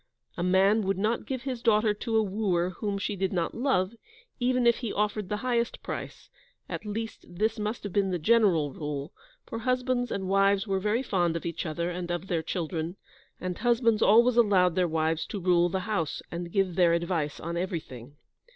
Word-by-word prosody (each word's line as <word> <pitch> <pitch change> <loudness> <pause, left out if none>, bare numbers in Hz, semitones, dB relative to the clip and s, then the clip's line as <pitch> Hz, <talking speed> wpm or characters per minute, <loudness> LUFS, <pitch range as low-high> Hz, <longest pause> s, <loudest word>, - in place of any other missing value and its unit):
A - - -4
man 190 +4 +4
would 195 -1 0
not 215 +4 -1
give 260 -2 -3
his 255 -3 -4
daughter 215 -2 +3
to 225 +2 -1
a 220 - +4
wooer 190 -3 0
whom 200 +2 -3
she 205 +1 -2
did 190 -1 -1
not 175 -3 -1
love, 220 -6 +1 0.5
even 250 0 +2
if 235 -1 +5
he 235 -4 -4
offered 210 -2 -1
the 210 - -1
highest 235 -2 0
price, - - -7 0.4
at - - -6
least 225 +2 -5
this 215 +5 -1
must 210 +2 -3
have 200 -3 -5
been 200 -1 +2
the 180 - 0
general 175 - +3
rule, 150 -1 -5 0.3
for 230 - -5
husbands 250 0 0
and 190 -1 -2
wives 195 +1 +3
were 195 -2 0
very 210 +6 0
fond 175 -8 +1
of 165 - -4
each 170 +1 -3
other, 170 +3 -2
and 175 0 -5
of 175 +1 -2
their 170 -4 -1
children, 165 0 -3 0.4
and 180 -1 -4
husbands 230 -2 +2
always 235 +3 +5
allowed 190 -6 +4
their 180 +1 +2
wives 160 0 0
to 205 - -4
rule 175 -1 +3
the 190 +1 -2
house, 180 -7 -2
and 170 0 -5
give 195 -2 +1
their 175 -1 +4
advice 170 -3 -1
on 170 +1 -4
everything. 155 - -5
195 Hz, 195 wpm, -28 LUFS, 175-220 Hz, 0.5 s, if